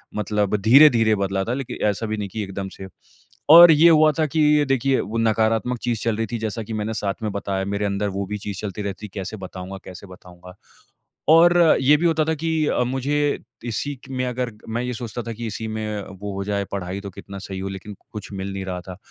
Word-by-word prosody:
मतलब 105 -1 0
धीरे-धीरे 115 -1 +6
बदला 95 -1 -1
था 120 - -2
लेकिन 135 -1 -5
ऐसा 105 +2 -1
भी 110 0 -3
नहीं 100 -2 -4
की 110 +2 -4
एकदम 95 0 -5
से। 95 - -8 0.6
और 170 +2 +11
ये 160 +2 +6
हुआ 155 -1 +6
था 155 - +3
कि 150 0 +3
देखिए 135 0 +2
वो 110 +4 -5
नकारात्मक 115 +2 +1
चीज़ 120 -3 -1
चल 115 -2 0
रही 115 - 0
थी, 120 - -1
जैसा 110 +1 -3
की 110 - -7
मैंने 110 +1 -2
साथ 100 -2 -2
में 105 - -1
बताया 100 -1 -3
मेरे 100 +1 -2
अंदर 100 +1 -1
वो 100 +1 -3
भी 105 +2 -4
चीज़ 100 -2 -6
चलती 105 0 -5
रहती 100 +1 -5
कैसे 100 +2 -5
बताऊँगा? 95 0 -8
कैसे 95 +2 -10
बताऊँगा? 90 0 -14 0.8
और 170 +1 +6
ये 140 +3 +5
भी 170 - -1
होता 160 -2 +2
था 160 - 0
कि 160 0 0
अ, 125 - +1
मुझे 140 +3 0 0.3
इसी 130 +5 -3
क - - -15
में 130 -1 -2
अगर 125 -1 -3 0.2
मैं 115 +2 -2
ये 125 0 -3
सोचता 120 0 -5
था 115 - -5
कि 115 +1 -6
इसी 110 +1 -5
में 110 -1 -4 0.2
वो 105 0 -4
हो 100 - -3
जाए 100 0 -1
पढ़ाई 95 0 -4
तो 100 - -7
कितना 100 +2 -10
सही 95 -1 -7
हो 95 +1 -4
लेकिन 95 +2 -8 0.2
कुछ 105 -2 -8
मिल 95 0 -4
नहीं 95 0 -4
रहा 90 -1 -4
था। 90 0 -10
110 Hz, 230 wpm, -22 LUFS, 100-125 Hz, 0.8 s, और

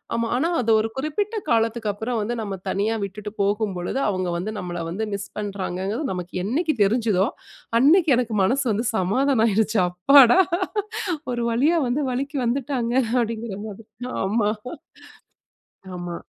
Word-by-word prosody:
ஆமா, 230 0 0
ஆனா 325 +7 +1
அது 230 - +1
ஒரு 225 - -1
குறிப்பிட்ட 400 +10 -2
காலத்துக்கப்பறம் 225 0 0
வந்து 235 +3 -2
நம்ப 200 -2 -4
தனியா 205 +4 0
விட்டுட்டு 205 +1 -6
போகும்பொழுது 200 +1 -1
அவுங்க 185 -2 -1
வந்து 210 +5 -4
நம்பள 175 -2 -4
வந்து 210 +6 -2
மிஸ் 200 0 -4
பண்ணுறாங்கங்குறது, 200 - -3
நமக்கு 180 -1 -6
என்னைக்கு 310 - 0
தெரிஞ்சுதோ! 210 -2 +2 0.5
அன்னக்கி 315 +2 +5
எனக்கு 230 -3 -1
மனசு 265 +7 +1
வந்து 220 +4 -1
சமாதானம் 240 +6 +2
ஆயிருச்சு. 215 0 +1
அப்பாடா! 250 - +6 0.9
ஒரு 240 -1 -1
வழியா 295 +9 +3
வந்து 265 +5 0
வலிக்கு 275 +3 -3
வந்துட்டாங்க. 245 -1 -1 0.2
அப்படிங்கிற 225 -3 -2
மாதிரி. 210 +2 -10 0.4
ஆமா, 210 +1 +1 1.5
ஆமா. 175 -1 -5
225 Hz, 130 wpm, -23 LUFS, 200-250 Hz, 1.5 s, அப்பாடா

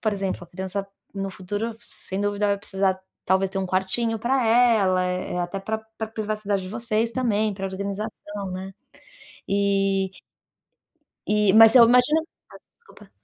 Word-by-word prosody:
por 215 -2 0
exemplo, 195 -2 -3
a - - -17
criança 190 +3 -5 0.3
no 195 0 -3
futuro, 205 +4 -4
sem 195 -4 -8
dúvida 205 0 0
vai 200 0 +2
precisar 195 -1 -1 0.3
talvez 190 +1 +2
ter 195 - -3
um 190 - -1
quartinho 190 +5 0
pra 250 +2 +1
ela, 220 -6 +4
eh, 180 0 -3
até 175 +2 -3
pra 220 +3 -2 0.2
pra 220 - -2
privacidade 215 -2 -2
de 185 - -7
vocês 230 0 -1
também, 220 -4 0
pra 195 0 -4
organização, 200 +1 -5
né, 190 +1 -6 0.8
e 195 -1 +1 1.2
e, 210 -1 +3
mas 225 +2 +8
eu 240 - +9
imagino 250 +6 +4 0.6
desculpa. 470 - -18
200 Hz, 150 wpm, -24 LUFS, 190-220 Hz, 1.2 s, eu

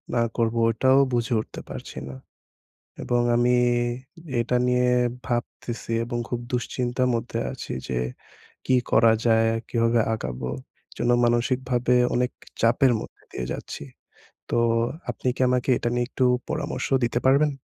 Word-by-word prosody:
না 120 - +3 0.2
করব, 115 -1 +1 0.2
এটাও 130 +4 +4
বুঝে 120 +1 0
উঠতে - - -9
পারছি - - -8
না। 65 - -8 0.9
এবং 120 0 +1
আমি 120 +1 +3 0.8
এটা 120 +2 +1
নিয়ে 125 0 +3 0.4
ভাবতেছি 120 -1 -4
এবং 120 0 -3
খুব 120 - -2
দুশ্চিন্তার 125 +1 -1
মধ্যে 115 - -2
আছি, - - -7 0.2
যে, 65 - -1 0.7
কী 130 - +4
করা 115 0 +6
যায়, 115 -1 +4 0.2
কীভাবে 115 0 +2
আগাবো? 65 - -4 0.4
এজন্য 120 - -1
মানসিকভাবে 125 +1 +1 0.2
অনেক 125 +1 +1 0.3
চাপের 120 +3 +4
মধ্যে - - -11
দিয়ে 60 - -4
যাচ্ছি। - - -7 0.7
তো - - +1 0.5
আপনি - - -3
কি - - -10
আমাকে 125 +1 +1
এটা - - -1
নিয়ে 120 0 0
একটু 130 - 0 0.2
পরামর্শ 130 - -3 0.2
দিতে 120 0 0
পারবেন? 140 +3 +4
120 Hz, 135 wpm, -25 LUFS, 115-125 Hz, 0.9 s, করা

